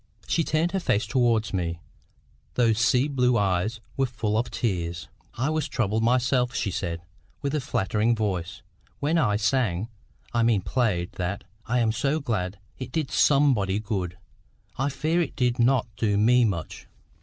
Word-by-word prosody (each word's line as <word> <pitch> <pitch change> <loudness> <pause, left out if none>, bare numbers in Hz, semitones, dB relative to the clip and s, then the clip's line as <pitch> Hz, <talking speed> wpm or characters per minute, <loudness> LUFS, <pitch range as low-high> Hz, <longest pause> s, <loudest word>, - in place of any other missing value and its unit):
She 165 - +1
turned 155 +3 +1
her 195 - 0
face 110 - +1
towards 120 -5 +1
me: 85 -3 -2 0.8
those 115 -3 +3
sea 125 +4 +3
blue 125 -4 +2
eyes 100 +3 0
were 135 -1 +1
full 110 -3 -2
of 120 +2 0
tears. 85 - -2 0.3
"I 130 +6 0
was 155 -1 -1
troubled 110 -4 0
myself," 125 +1 +2
she 100 - -1
said, 85 -2 -3 0.4
with 140 0 -1
a 150 - 0
faltering 110 0 +1
voice, 95 -3 -3 0.4
"when 155 +4 +1
I 105 -9 +2
sang—I 110 +1 -2
mean 115 -4 +3
played—that. 95 -3 -1 0.2
I 125 - +1
am 115 -2 +2
so 140 +7 0
glad 105 -9 -2 0.2
it 130 - -6
did 155 -4 -2
somebody 130 -10 +3
good! 95 -5 -3 0.6
I 135 +2 0
fear 155 +5 0
it 155 - -3
did 125 -2 0
not 125 +1 +3
do 105 -1 +1
me 120 +3 +5
much. 90 -7 -4
115 Hz, 155 wpm, -26 LUFS, 100-130 Hz, 0.8 s, me